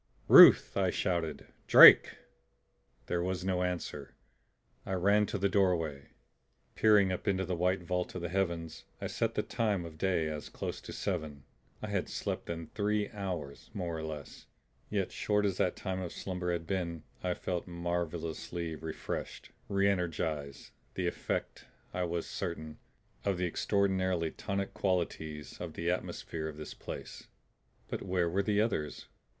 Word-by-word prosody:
"Ruth!" - - +9
I 95 -2 +2
shouted. 85 -5 -1 0.2
"Drake!" - - +10 0.9
There 85 - -1
was 90 0 -2
no 90 -1 +1
answer. 90 -1 -4 0.7
I 95 - -4
ran 100 +3 +3
to - - -2
the 100 +1 +2
doorway. 85 -8 +1 0.6
Peering 105 -3 +5
up 90 - -4
into 95 -1 +1
the 90 +1 -2
white 90 +1 +1
vault 90 +1 -2
of 90 - -4
the 85 - -2
heavens 85 -4 -2
I - - -5
set - - -1
the - - +1
time 105 -6 -1
of 80 -1 -10
day 90 -4 +1
as 75 -1 -5
close - - -5
to - - -9
seven; 80 -7 -3 0.4
I - - -3
had - - -1
slept - - -3
then 85 -1 -4
three 105 0 0
hours, 90 -9 -5
more 90 -4 -3
or 80 - -4
less. 75 -3 -7 0.4
Yet - - -1
short 105 -1 +1
as 95 -2 0
that 90 - +1
time 95 -1 -3
of 90 -2 -5
slumber 90 -2 -3
had 85 -1 -2
been, 85 -4 -3 0.2
I 90 -1 0
felt 90 -1 -3
marvelously 85 -1 -3
refreshed, 80 0 -6 0.2
reenergized; 85 -7 -1 0.2
the - - -1
effect, - - -3 0.3
I 90 0 0
was 85 -1 -2
certain, 80 -4 -5 0.4
of 100 -2 0
the 90 - 0
extraordinarily 95 -2 +1
tonic 100 0 -3
qualities 80 -5 -2
of 85 -3 -5
the 85 +2 -1
atmosphere 80 -3 -4
of 75 -1 -7
this 75 - -7
place. - - -8 0.6
But - - -4
where 90 -2 0
were 95 +4 +1
the 105 +1 +2
others? 85 -10 -2
90 Hz, 155 wpm, -32 LUFS, 80-95 Hz, 0.9 s, Drake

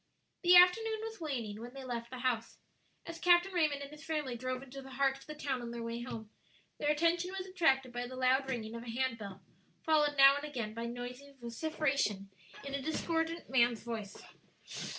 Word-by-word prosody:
The 360 0 +7
afternoon 440 +5 +6
was 445 -3 -7
waning 230 -9 -3
when 245 +2 -9
they 270 - -7
left 235 -2 -4
the 255 - -7
house. 245 -3 -1 0.5
As 335 0 -7
Captain 355 +2 +4
Raymond 305 -5 +1
and 280 - -9
his 300 +1 -12
family 300 -6 -2
drove 255 +2 -3
into 275 +1 -9
the 265 - -11
heart 270 0 +1
of - - -16
the 305 - -6
town 275 -4 -2
on 240 - -5
their 235 0 -5
way 230 +1 -4
home, 225 -3 -7 0.5
their 295 - +1
attention 335 +4 +2
was 375 - -4
attracted 270 -9 +2
by 245 0 -3
the 255 - -8
loud 260 +1 +2
ringing 225 -4 -3
of 230 - -6
a 240 - -8
hand 240 0 -1
bell, 195 -2 -8 0.4
followed 300 -2 +3
now 275 +1 +8
and 285 - -5
again 240 -8 -4
by 230 +1 -4
noisy 250 +4 -7
vociferation, 240 -5 -1 0.3
in 275 - -5
a 280 - -1
discordant, 325 +2 -1
man's 240 -3 +3
voice. 220 -4 -6
265 Hz, 200 wpm, -33 LUFS, 235-310 Hz, 0.5 s, now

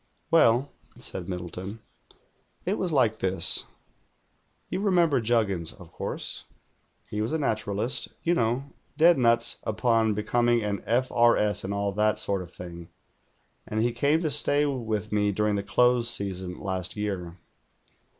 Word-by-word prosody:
"Well," 135 -4 +4 0.2
said 95 -1 -6
Middleton. 90 +4 -6 0.9
"It 195 +5 -1
was 180 - -1
like 115 -7 +2
this. 95 -2 +3 1.0
You - - -3
remember 175 - +2
Juggins, 105 -8 0
of 90 -4 -15
course.'* - - -3 0.6
He 105 - -4
was 110 - -2
a - - +2
naturalist, 110 -2 0 0.2
you 170 - +2
know, 120 -2 0 0.3
dead 170 -1 +5
nuts 115 -1 +3
upon 110 0 +1
becoming 120 +2 +1
an 100 -2 -2
F. 125 +3 +1
R. 120 0 +4
S. 105 -1 0
and 95 - -4
all 100 0 -1
that 105 +2 +1
sort 100 -2 -1
of 90 -1 -10
thing, 85 -2 -10 0.8
and 110 - -2
he 120 - +1
came 145 +6 +2
to 155 -3 -1
stay 145 +1 +3
with 110 -6 -3
me 105 -1 +1
during 105 +1 0
the 100 - 0
close 120 +4 +3
season* 95 -4 -2
last 95 -2 -2
year. 95 -5 -4
110 Hz, 150 wpm, -26 LUFS, 100-125 Hz, 1.0 s, dead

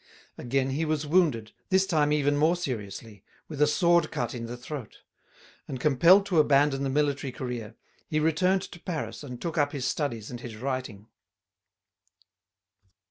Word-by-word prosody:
Again 135 +2 -1
he 145 +5 -1
was 155 -1 -1
wounded, 145 -9 +2 0.2
this 190 0 +3
time 155 -6 +2
even 145 -1 +2
more 155 +4 +3
seriously, 110 - -6 0.2
with 150 -2 -6
a 150 - +6
sword 170 +1 +3
cut 120 -1 -3
in 115 -2 -5
the 120 +1 -6
throat. 125 -2 -8 0.6
And 130 - -5
compelled 165 +8 +5
to 180 -5 +2
abandon 140 -2 +3
the 135 - -1
military 140 -1 0
career, 120 -4 -6 0.3
he 155 - 0
returned 180 +5 +2
to 175 - -10
Paris 165 -4 -5
and 125 -4 -8
took 165 +1 -3
up 145 0 +1
his 135 -3 -3
studies 120 -6 -2
and 120 - -6
his 120 -2 -8
writing. 125 -4 -4
145 Hz, 160 wpm, -27 LUFS, 125-155 Hz, 0.6 s, a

